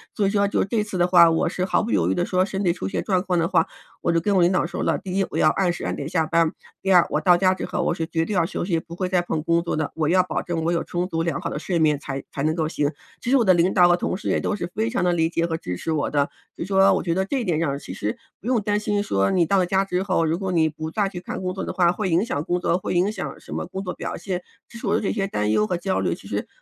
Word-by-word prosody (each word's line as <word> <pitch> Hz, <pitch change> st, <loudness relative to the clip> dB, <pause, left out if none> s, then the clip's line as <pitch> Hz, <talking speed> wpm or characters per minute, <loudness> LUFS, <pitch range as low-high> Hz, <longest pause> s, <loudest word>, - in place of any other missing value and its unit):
所 205 Hz, -, +1 dB
以 -, -, +3 dB
说 200 Hz, 0 st, +2 dB
就 200 Hz, -, 0 dB
是 -, -, 0 dB
这 220 Hz, -1 st, +1 dB
次 210 Hz, -3 st, -5 dB
的 175 Hz, -, +3 dB
话， 175 Hz, -2 st, +7 dB
我 165 Hz, +1 st, +1 dB
是 180 Hz, 0 st, -2 dB
毫 190 Hz, -, +1 dB
不 230 Hz, -, -3 dB
犹 -, -, +2 dB
豫 -, -, +2 dB
地 175 Hz, -, 0 dB
说， 185 Hz, 0 st, +1 dB
身 195 Hz, 0 st, -3 dB
体 175 Hz, -, +3 dB
出 95 Hz, -, -5 dB
现 -, -, -2 dB
状 185 Hz, -3 st, +1 dB
况 180 Hz, -2 st, 0 dB
的 165 Hz, -, +1 dB
话， 165 Hz, -, +2 dB, 0.3 s
我 -, -, +1 dB
就 165 Hz, -, +2 dB
跟 200 Hz, +4 st, +1 dB
我 185 Hz, -, +4 dB
领 175 Hz, +1 st, +4 dB
导 180 Hz, -, +2 dB
说 170 Hz, -, -4 dB
了， -, -, +1 dB
第 190 Hz, 0 st, -5 dB
一， 195 Hz, -, +2 dB
我 -, -, -3 dB
要 155 Hz, -, +5 dB
按 185 Hz, 0 st, +1 dB
时 -, -, -7 dB
按 -, -, -1 dB
点 140 Hz, -, -5 dB
下 165 Hz, -2 st, +1 dB
班， 165 Hz, 0 st, +2 dB, 0.3 s
第 195 Hz, -, 0 dB
二， 175 Hz, -2 st, +6 dB
我 -, -, 0 dB
到 180 Hz, -2 st, +6 dB
家 185 Hz, +1 st, +3 dB
之 -, -, -5 dB
后， -, -, -2 dB
我 -, -, +1 dB
是 165 Hz, -1 st, -3 dB
绝 165 Hz, -1 st, 0 dB
对 210 Hz, -, -3 dB
要 175 Hz, -3 st, +3 dB
休 180 Hz, -, -3 dB
息， 170 Hz, -3 st, 0 dB
不 170 Hz, +1 st, -10 dB
会 185 Hz, +1 st, -2 dB
再 180 Hz, -1 st, +2 dB
碰 165 Hz, -3 st, -2 dB
工 170 Hz, +1 st, +2 dB
作 170 Hz, -, -2 dB
的， 155 Hz, -1 st, -2 dB
我 155 Hz, -2 st, 0 dB
要 185 Hz, +1 st, +4 dB
保 180 Hz, -, -2 dB
证 165 Hz, -2 st, -3 dB
我 165 Hz, -, +1 dB
有 170 Hz, -, 0 dB
充 175 Hz, +1 st, -2 dB
足 165 Hz, -3 st, -2 dB
良 170 Hz, -1 st, -1 dB
好 170 Hz, -, -3 dB
的 -, -, -4 dB
睡 175 Hz, -3 st, -1 dB
眠 150 Hz, -3 st, +3 dB
才 135 Hz, -1 st, -5 dB
才 140 Hz, -, -4 dB
能 155 Hz, +1 st, +1 dB
够 160 Hz, -2 st, 0 dB
行。 150 Hz, -2 st, -1 dB, 0.3 s
其 -, -, -3 dB
实 270 Hz, -, +4 dB
我 240 Hz, -, +3 dB
的 185 Hz, -, +6 dB
领 175 Hz, +2 st, +2 dB
导 175 Hz, -1 st, +6 dB
和 175 Hz, -, +5 dB
同 180 Hz, -, -2 dB
事， -, -, -4 dB
也 -, -, +2 dB
都 210 Hz, -, -1 dB
是 205 Hz, -, -4 dB
非 220 Hz, +2 st, 0 dB
常 245 Hz, -2 st, -1 dB
地 180 Hz, -, +3 dB
理 165 Hz, -1 st, +2 dB
解 170 Hz, 0 st, 0 dB
和 165 Hz, -1 st, -2 dB
支 90 Hz, -, -5 dB
持 165 Hz, -, -3 dB
我 155 Hz, -2 st, 0 dB
的， 145 Hz, -1 st, +1 dB, 0.3 s
所 -, -, -5 dB
以 -, -, -5 dB
说， 195 Hz, 0 st, +4 dB
我 -, -, 0 dB
觉 170 Hz, -, 0 dB
得 190 Hz, +2 st, 0 dB
这 270 Hz, +7 st, -1 dB
一 -, -, -2 dB
点 170 Hz, -7 st, 0 dB
上， 140 Hz, -4 st, 0 dB
其 90 Hz, -, -8 dB
实 105 Hz, +3 st, -3 dB, 0.2 s
不 215 Hz, -, -9 dB
用 250 Hz, -3 st, +2 dB
担 205 Hz, 0 st, 0 dB
心 205 Hz, -1 st, 0 dB
说 100 Hz, -, +1 dB
你 180 Hz, -2 st, +3 dB
到 195 Hz, +5 st, +2 dB
了 185 Hz, -, +3 dB
家 190 Hz, +2 st, +2 dB
之 180 Hz, -1 st, -1 dB
后， 185 Hz, -4 st, +1 dB
如 160 Hz, +2 st, 0 dB
果 190 Hz, -2 st, -2 dB
你 165 Hz, -3 st, +3 dB
不 155 Hz, +1 st, -6 dB
再 205 Hz, +2 st, +1 dB
去 180 Hz, -, -7 dB
看 180 Hz, -, -6 dB
工 185 Hz, 0 st, -2 dB
作 190 Hz, -, -4 dB
的 -, -, -3 dB
话， 175 Hz, -2 st, +3 dB
会 190 Hz, +1 st, -2 dB
影 175 Hz, +5 st, +2 dB
响 145 Hz, -10 st, -2 dB
工 175 Hz, +2 st, -1 dB
作， 175 Hz, 0 st, +1 dB
会 185 Hz, -, -3 dB
影 180 Hz, +4 st, +2 dB
响 215 Hz, -, -6 dB
什 -, -, -10 dB
么 -, -, -3 dB
工 190 Hz, -, -5 dB
作 180 Hz, -, -4 dB
表 -, -, -5 dB
现， 185 Hz, -2 st, -4 dB, 0.3 s
其 235 Hz, -, -11 dB
实 220 Hz, -, -6 dB
我 205 Hz, -, +2 dB
的 -, -, +1 dB
这 200 Hz, -, -1 dB
些 195 Hz, -3 st, -1 dB
担 105 Hz, -, -1 dB
忧 105 Hz, 0 st, +3 dB
和 175 Hz, -, -1 dB
焦 190 Hz, +2 st, -1 dB
虑， -, -, 0 dB
其 -, -, -14 dB
实 -, -, -3 dB
175 Hz, 370 characters per minute, -23 LUFS, 165-195 Hz, 0.3 s, 话